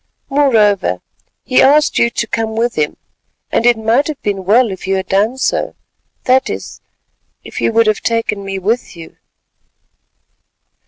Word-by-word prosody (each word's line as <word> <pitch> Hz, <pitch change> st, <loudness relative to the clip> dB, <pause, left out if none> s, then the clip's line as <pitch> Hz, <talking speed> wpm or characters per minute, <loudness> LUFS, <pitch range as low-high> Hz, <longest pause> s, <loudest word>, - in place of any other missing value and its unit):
"Moreover 210 Hz, -, +2 dB, 0.4 s
he 255 Hz, -, +3 dB
asked 295 Hz, +2 st, +4 dB
you 235 Hz, -, +3 dB
to 235 Hz, -, -2 dB
come 220 Hz, 0 st, -3 dB
with 235 Hz, +1 st, 0 dB
him, 150 Hz, -1 st, -2 dB, 0.5 s
and 235 Hz, -, +2 dB
it 240 Hz, -1 st, +4 dB
might 225 Hz, +6 st, +1 dB
have 305 Hz, -3 st, -5 dB
been 195 Hz, -2 st, -2 dB
well 225 Hz, +3 st, +3 dB
if 190 Hz, 0 st, -8 dB
you 195 Hz, -, +1 dB
had 190 Hz, 0 st, -3 dB
done 210 Hz, +7 st, +1 dB
so, -, -, -1 dB, 0.5 s
that 260 Hz, +1 st, +2 dB
is, -, -, -7 dB, 0.6 s
if -, -, -7 dB
you -, -, +1 dB
would 230 Hz, 0 st, +3 dB
have 215 Hz, -1 st, +1 dB
taken 225 Hz, -3 st, -1 dB
me 195 Hz, 0 st, -4 dB
with 210 Hz, +3 st, -2 dB
you!" 165 Hz, -1 st, -12 dB
225 Hz, 160 wpm, -15 LUFS, 195-245 Hz, 0.6 s, asked